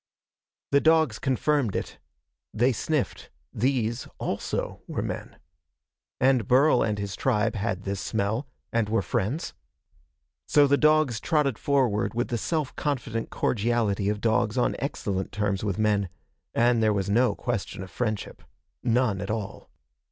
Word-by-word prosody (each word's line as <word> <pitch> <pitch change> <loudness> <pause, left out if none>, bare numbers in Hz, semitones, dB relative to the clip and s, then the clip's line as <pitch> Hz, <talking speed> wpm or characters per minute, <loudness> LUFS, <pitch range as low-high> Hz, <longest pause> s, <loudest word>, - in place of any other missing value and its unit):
The 140 0 +5
dogs 160 -8 +3
confirmed 135 -3 +1
it. - - -4 0.6
They 120 +4 +3
sniffed. 145 +4 -2 0.2
These, 120 -1 0
also, - - -3
were - - -3
men. - - -5 0.8
And 130 -4 +3
Burl 130 +1 +5
and 105 -1 0
his 100 -2 -4
tribe 115 -2 +1
had 100 -3 -2
this 100 -1 -3
smell, 110 +6 -1 0.3
and 115 -3 +1
were 110 -2 +1
friends. 105 - -2 0.9
So 145 -1 +5
the 140 0 +4
dogs 155 -6 +3
trotted 150 -7 +1
forward 125 -8 +1
with 120 - -1
the 120 - -1
self 155 -1 -2
confident 115 -6 -2
cordiality 105 -3 0
of 105 0 -2
dogs 110 0 +1
on 125 - +2
excellent 100 -8 -3
terms 105 -2 -1
with 100 -3 -1
men 105 -3 +1 0.5
and 120 0 +3
there 110 -1 +3
was 100 -2 -1
no 120 +5 +3
question 105 -5 -3
of 95 - -11
friendship. 110 -4 -3 0.4
None 120 -5 +1
at 100 - -5
all. 105 -2 -4
115 Hz, 145 wpm, -26 LUFS, 105-130 Hz, 0.9 s, The